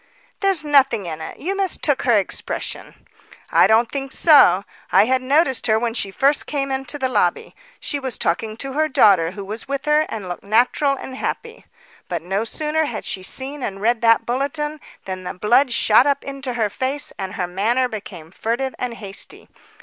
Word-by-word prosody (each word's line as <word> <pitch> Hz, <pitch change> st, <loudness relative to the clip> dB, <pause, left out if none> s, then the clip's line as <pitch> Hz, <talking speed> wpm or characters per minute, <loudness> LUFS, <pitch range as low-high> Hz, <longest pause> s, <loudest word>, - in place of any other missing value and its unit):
"There's 385 Hz, -6 st, +1 dB
nothing 270 Hz, -8 st, +3 dB
in 160 Hz, -2 st, -5 dB
it. -, -, -7 dB
You 380 Hz, +5 st, -3 dB
mistook 365 Hz, -7 st, 0 dB
her 235 Hz, -4 st, +4 dB
expression." 195 Hz, -, -5 dB, 0.5 s
"I -, -, +6 dB
don't 225 Hz, +1 st, +3 dB
think 275 Hz, -1 st, -4 dB
so. 240 Hz, -, +6 dB, 0.3 s
I -, -, +6 dB
had 260 Hz, +2 st, +1 dB
noticed 265 Hz, -1 st, +2 dB
her 220 Hz, -1 st, +3 dB
when 230 Hz, 0 st, -1 dB
she 200 Hz, -4 st, -2 dB
first 275 Hz, +9 st, +1 dB
came 275 Hz, -2 st, -2 dB
into 265 Hz, +1 st, -3 dB
the 265 Hz, -2 st, 0 dB
lobby. 255 Hz, -, 0 dB, 0.2 s
She 290 Hz, -, -2 dB
was 260 Hz, -3 st, -4 dB
talking 215 Hz, +6 st, -1 dB
to 270 Hz, +2 st, -5 dB
her 310 Hz, +2 st, +1 dB
daughter 195 Hz, -, +4 dB
who 195 Hz, +2 st, -8 dB
was 215 Hz, +3 st, -6 dB
with 275 Hz, 0 st, -3 dB
her, 300 Hz, +1 st, +3 dB
and 210 Hz, -4 st, -6 dB
looked 175 Hz, -1 st, -6 dB
natural 245 Hz, +7 st, +2 dB
and 260 Hz, -, -8 dB
happy. 460 Hz, -, -5 dB, 0.4 s
But 170 Hz, -2 st, -3 dB
no 195 Hz, +5 st, -1 dB
sooner 310 Hz, +5 st, -1 dB
had 235 Hz, -6 st, -5 dB
she 190 Hz, -, -2 dB
seen 270 Hz, +9 st, -5 dB
and 195 Hz, -5 st, -4 dB
read 230 Hz, +2 st, +1 dB
that 230 Hz, -1 st, +4 dB
bulletin, 295 Hz, +4 st, -2 dB, 0.3 s
than 185 Hz, -1 st, -5 dB
the 180 Hz, -, -6 dB
blood 240 Hz, +8 st, +3 dB
shot 235 Hz, +3 st, +4 dB
up 280 Hz, -1 st, +1 dB
into 275 Hz, -2 st, -5 dB
her 220 Hz, -4 st, -1 dB
face 270 Hz, +5 st, -3 dB
and 190 Hz, -1 st, -4 dB
her 180 Hz, -, -1 dB
manner 220 Hz, +8 st, 0 dB
became 190 Hz, -8 st, -9 dB
furtive 240 Hz, +7 st, -2 dB
and 245 Hz, -2 st, -3 dB
hasty. 200 Hz, -3 st, -8 dB
245 Hz, 190 wpm, -21 LUFS, 210-280 Hz, 0.5 s, I